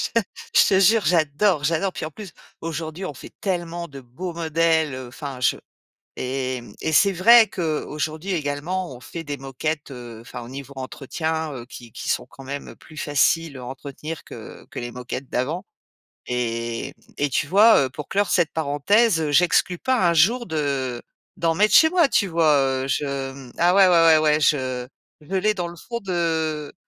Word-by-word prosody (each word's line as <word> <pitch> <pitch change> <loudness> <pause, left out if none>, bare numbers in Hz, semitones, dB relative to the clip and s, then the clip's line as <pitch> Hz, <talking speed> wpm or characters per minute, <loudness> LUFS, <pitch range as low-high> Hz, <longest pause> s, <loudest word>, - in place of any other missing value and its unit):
je - - +6 0.4
je - - +7
te 190 - +4
jure, 210 +3 +4
j'adore, 160 0 +2
j'adore. 165 +5 0
Puis - - -4
en 155 - -6
plus, 200 +2 -10 0.3
aujourd'hui, 165 +2 -5
on 150 - -5
fait 125 - -12
tellement 175 -3 -3
de 140 -3 -10
beaux 135 +9 -7
modèles, 160 -2 +1
enfin, 135 +1 -7
je 125 - +2 0.6
et 130 -1 -2
mmh, 105 - -13
et 160 - -1
c'est 200 +5 +5
vrai 225 +5 +7
qu'aujourd'hui, 155 +1 -3
également, 160 +3 -3
on - - -12
fait 165 +6 -8
des 145 -2 -5
moquettes, 140 +3 -4
heu, 120 -3 -9
enfin 120 +1 -9
au 115 - -10
niveau 140 +1 -8
entretien, 155 +4 -3
heu, 120 -3 -8
qui 120 -2 -12
qui - - -6
sont - - 0
quand 135 - -14
même 140 +2 -7
plus 155 - -16
faciles 145 +1 +1
à 125 - -8
entretenir 140 +4 -7
que - - -11
que - - -5
les 120 0 -5
moquettes 125 +2 -6
d'avant 150 +9 -2 0.6
et 120 +1 -3 0.2
et 145 - 0
tu 140 +3 0
vois, 210 +7 +6
heu, - - -4
pour 140 +3 -8
clore 200 -1 0
cette 170 -3 +2
parenthèse, 160 +4 +2
j'exclus 180 +3 +3
pas, 255 -3 +1
un - - +2
jour, 225 +10 +3
de 140 - -2 0.4
d'en 165 -1 +1
mettre 210 +4 +3
chez 320 - +8
moi, 345 -3 +4
tu 200 - +2
vois? 165 -2 +2
Heu, 135 -1 0
je 135 0 -2
mmh 135 -2 -12
ah, 175 +2 +4
ouais, 195 -1 +7
ouais, 165 -3 +6 0.2
ouais, 150 - +2
je 130 -4 0 0.3
je 175 +6 -6
l'ai 210 +3 +2
dans 180 -4 -3
le 170 - -9
fond 235 +7 -6
de 160 -6 -2
155 Hz, 185 wpm, -23 LUFS, 135-175 Hz, 0.6 s, chez